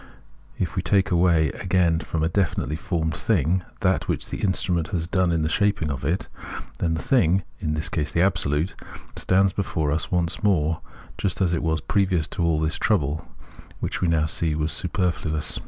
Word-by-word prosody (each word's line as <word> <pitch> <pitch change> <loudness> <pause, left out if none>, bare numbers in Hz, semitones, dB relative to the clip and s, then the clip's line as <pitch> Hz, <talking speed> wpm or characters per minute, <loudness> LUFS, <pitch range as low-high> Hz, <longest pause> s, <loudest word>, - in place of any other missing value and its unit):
If 90 - -2
we 95 - +1
take 95 +1 +2
away 85 -3 +4
again 85 0 +1
from 80 -1 -2
a - - +3
definitely 80 -5 0
formed 80 -2 -1
thing 90 -3 +1 0.2
that - - +1
which - - -2
the - - -4
instrument 90 -4 +1
has 85 -5 -2
done 90 0 +1
in 80 -2 +1
the - - +1
shaping 95 -4 +1
of 70 -1 -5
it, 80 +7 -1 0.5
then 80 -1 +1
the 80 - -4
thing 95 - +3 0.2
(in 75 -2 -1
this 75 +1 -1
case 75 -4 -2
the 85 - +1
Absolute) 85 -3 +1 0.4
stands 95 +1 +3
before 80 -6 -1
us 75 - -1
once 85 -1 0
more 80 -6 +2 0.4
just 95 - 0
as 90 -3 +2
it 80 - 0
was 80 0 0
previous 95 -6 +1
to 85 - -2
all 80 -2 +2
this 80 0 0
trouble, 80 -4 +1 0.5
which, - - -2
as - - -8
we 90 - +2
now 80 -2 +2
see, 80 0 0
was 75 0 -1
superfluous. 85 -3 -1
85 Hz, 190 wpm, -24 LUFS, 80-95 Hz, 0.5 s, away